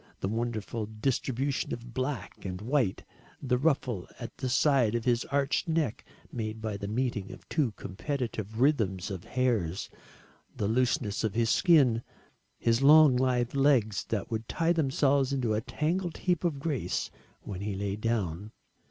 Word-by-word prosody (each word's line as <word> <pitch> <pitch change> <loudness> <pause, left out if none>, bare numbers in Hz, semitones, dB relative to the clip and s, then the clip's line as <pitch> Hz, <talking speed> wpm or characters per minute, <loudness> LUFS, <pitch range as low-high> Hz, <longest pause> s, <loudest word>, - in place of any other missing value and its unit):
The - - -2
wonderful 110 0 -3
distribution 130 +4 -1
of 120 0 -12
black 130 -5 -4
and 95 -1 -4
white, 120 -2 0 0.4
the 125 -2 0
ruffle 130 - 0
at - - -7
the 130 - -2
side 130 -3 +3
of 115 - -2
his 120 -1 +2
arched 140 +2 0
neck 160 -8 0 0.3
made 110 -2 -4
by 110 -1 -3
the 100 0 -5
meeting 110 -3 -2
of - - -12
two 140 -9 +1
competitive 110 -1 -4
rhythms 110 -9 +1
of 95 -3 -6
hairs, 110 -9 -1 0.7
the 100 - 0
looseness 120 -1 +1
of 110 -3 -1
his 115 -1 +2
skin, 135 -10 +4 0.6
his 115 +2 +2
long 150 -1 +7
lithe 125 -1 +1
legs 130 -8 +3
that 110 0 -3
would 110 0 -3
tie 165 +1 +2
themselves 140 -3 +2
into 125 -5 0
a 105 - 0
tangled 170 - -2
heap 180 -2 0
of 165 -5 0
grace 140 -3 -2 0.3
when 95 -2 -6
he 100 -1 -3
lay 100 0 -2
down. 105 -3 -2
120 Hz, 155 wpm, -29 LUFS, 105-140 Hz, 0.7 s, long